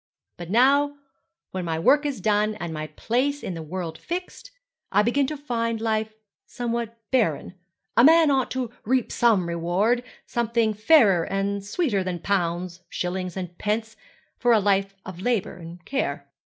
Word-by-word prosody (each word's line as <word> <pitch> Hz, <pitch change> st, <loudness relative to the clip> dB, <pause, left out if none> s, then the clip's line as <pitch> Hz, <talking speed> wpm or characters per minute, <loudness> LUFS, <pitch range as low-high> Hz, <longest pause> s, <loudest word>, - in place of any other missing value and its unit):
But 175 Hz, -1 st, -9 dB
now, 280 Hz, +6 st, +4 dB, 0.6 s
when 185 Hz, -1 st, -3 dB
my 165 Hz, -2 st, -2 dB
work 290 Hz, -, +4 dB
is 270 Hz, -8 st, -4 dB
done, 210 Hz, +2 st, +2 dB
and 175 Hz, -5 st, -5 dB
my 155 Hz, 0 st, -4 dB
place 270 Hz, -, -1 dB
in 185 Hz, -, -3 dB
the 165 Hz, -, -6 dB
world 165 Hz, 0 st, -5 dB
fixed, 360 Hz, +2 st, -6 dB, 0.4 s
I 205 Hz, +2 st, +4 dB
begin 265 Hz, +5 st, +2 dB
to 305 Hz, +1 st, -4 dB
find 230 Hz, -5 st, -2 dB
life 220 Hz, -1 st, -1 dB, 0.3 s
somewhat 235 Hz, -1 st, -3 dB
barren. 215 Hz, -, +1 dB, 0.4 s
A 235 Hz, -, +6 dB
man 320 Hz, +1 st, +7 dB
ought 265 Hz, -2 st, +1 dB
to 255 Hz, -3 st, -3 dB
reap 255 Hz, +1 st, 0 dB
some 215 Hz, -7 st, +3 dB
reward 175 Hz, +8 st, +1 dB, 0.2 s
something 230 Hz, -2 st, 0 dB
fairer 210 Hz, -, +5 dB
and 195 Hz, 0 st, -2 dB
sweeter 205 Hz, -, 0 dB
than 185 Hz, -1 st, -3 dB
pounds, 175 Hz, -1 st, -2 dB
shillings, 180 Hz, 0 st, -3 dB
and 180 Hz, -2 st, -5 dB
pence, 220 Hz, +1 st, -2 dB, 0.4 s
for 245 Hz, -1 st, +4 dB
a 220 Hz, -, +5 dB
life 195 Hz, -1 st, +1 dB
of 185 Hz, -1 st, -8 dB
labour 225 Hz, -6 st, -1 dB
and 175 Hz, +1 st, -11 dB
care.' 275 Hz, 0 st, -2 dB
215 Hz, 160 wpm, -24 LUFS, 180-245 Hz, 0.6 s, man